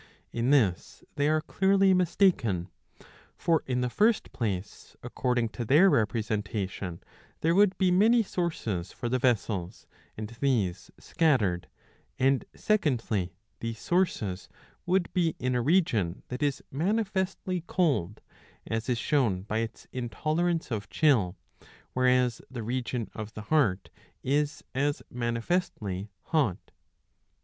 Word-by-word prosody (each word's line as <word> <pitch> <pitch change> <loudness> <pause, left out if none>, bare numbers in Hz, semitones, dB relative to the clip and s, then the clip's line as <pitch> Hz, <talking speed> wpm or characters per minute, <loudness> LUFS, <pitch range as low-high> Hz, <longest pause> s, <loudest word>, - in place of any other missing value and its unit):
In 120 +2 0
this 110 -11 +1
they 145 +1 +1
are 155 0 +2
clearly 195 +3 +3
mistaken. 165 - +2 0.7
For 165 -2 +2
in 125 -1 0
the 125 - 0
first 215 - +2
place, 100 -5 -4
according 125 -3 0
to 120 - -5
their 155 - +5
representation, 105 -5 -1 0.4
there 165 +1 +3
would 200 +1 +4
be 185 -2 +3
many 225 +6 +5
sources 115 - -3
for 120 - -4
the 130 +1 +1
vessels, 105 -7 -1 0.3
and 110 0 -4
these 115 -6 -1
scattered; 110 - +1 0.5
and 135 0 +2
secondly 115 - 0 0.2
these 115 -1 -4
sources 110 - -1 0.4
would 180 0 +1
be 170 -4 +1
in 125 0 -1
a 125 - +1
region 115 - +1
that 125 +3 -5
is 145 -2 0
manifestly 190 +1 -1
cold, 135 - 0 0.4
as 115 +2 -3
is 125 - +1
shown 115 - +1
by 110 +2 -2
its 115 0 -5
intolerance 155 +7 -1
of 105 -3 -3
chill, 115 - +3 0.6
whereas 125 -1 +2
the 125 -3 -6
region 120 0 -2
of 110 0 -7
the 110 - -5
heart 115 -12 +2 0.3
is 145 +2 0
as 145 +2 0
manifestly 115 - -2
hot.' 145 - 0
125 Hz, 125 wpm, -28 LUFS, 110-165 Hz, 0.7 s, their